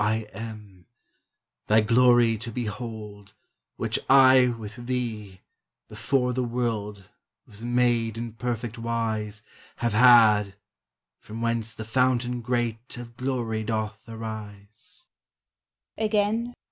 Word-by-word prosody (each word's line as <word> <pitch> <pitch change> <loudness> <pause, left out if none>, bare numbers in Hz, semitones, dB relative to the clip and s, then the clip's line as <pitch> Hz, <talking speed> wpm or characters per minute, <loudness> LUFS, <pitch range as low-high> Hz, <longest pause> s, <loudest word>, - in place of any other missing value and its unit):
I 110 +1 0
am 105 -4 -9 0.8
Thy 110 +1 +5
glory 120 0 +4
to 115 +2 -6
behold; 105 -3 -6 0.4
Which - - -1
I 130 -1 +7
with 115 0 -6
Thee, 110 -7 -4 0.5
before 125 -2 0
the 130 +1 -1
world 110 -5 -3 0.4
Was 105 +1 -14
made 120 -2 +1
in 115 -1 -5
perfect 120 -1 -4
wise, 110 -2 -3 0.3
Have 120 -2 -1
had 105 -4 +6 0.6
from 110 +1 -9
whence 115 -1 -1
the 110 - -7
fountain 125 +1 +1
great 120 0 -2
Of 120 -1 -9
glory 120 -3 -2
doth 110 -1 -3
arise." 110 - -9
115 Hz, 105 wpm, -26 LUFS, 105-120 Hz, 0.8 s, I